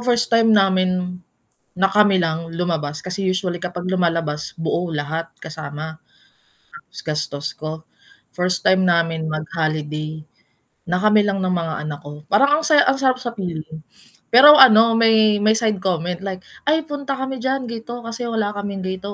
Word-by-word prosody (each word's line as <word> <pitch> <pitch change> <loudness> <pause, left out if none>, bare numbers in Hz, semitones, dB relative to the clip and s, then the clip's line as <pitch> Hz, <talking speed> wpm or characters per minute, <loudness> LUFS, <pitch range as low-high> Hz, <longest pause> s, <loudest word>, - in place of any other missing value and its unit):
first 240 -1 0
time 230 0 +4
namin, 185 -2 +1 0.5
na 195 +1 +1
kami 205 -2 +3
lang 165 0 -3
lumabas, 165 -4 -3
kasi 185 +2 -4
usually 185 -1 -1
kapag 180 +1 -6
lumalabas, 165 -5 -1
buo, 170 +2 -2
lahat, 160 +3 -4
kasama, 155 0 -7 0.9
ta's - - -11
gastos 145 -2 -3
ko. 155 +1 -7 0.5
First 180 0 -1
time 190 0 +4
namin 165 -2 0
mag-holiday, 155 0 -4 0.7
na 180 - +1
kami 215 +2 +4
lang 200 -1 -1
ng 185 -1 -1
mga 165 -2 -2
anak 145 -1 -6
ko, 150 +1 -11
parang 280 - +3
ang 315 - -3
saya 300 -1 +5
ang 270 - +1
sarap 260 -2 +1
sa 245 - -3
feeling. 160 -4 -6 0.5
Pero 295 +4 +9
ano, 230 -3 +7
may 220 -2 +4
may 215 +1 +3
side 220 -2 0
comment, 180 -2 -2
like, 185 -2 -5 0.2
"Ay, 310 +2 +2
punta 290 -3 -5
kami 265 0 -4
diyan, 260 0 -2
ganito, 235 +1 -7
kasi 230 +1 -6
wala 225 -3 -1
kaming 200 -1 -5
ganito, 190 +2 -5
185 Hz, 160 wpm, -20 LUFS, 160-225 Hz, 0.9 s, Pero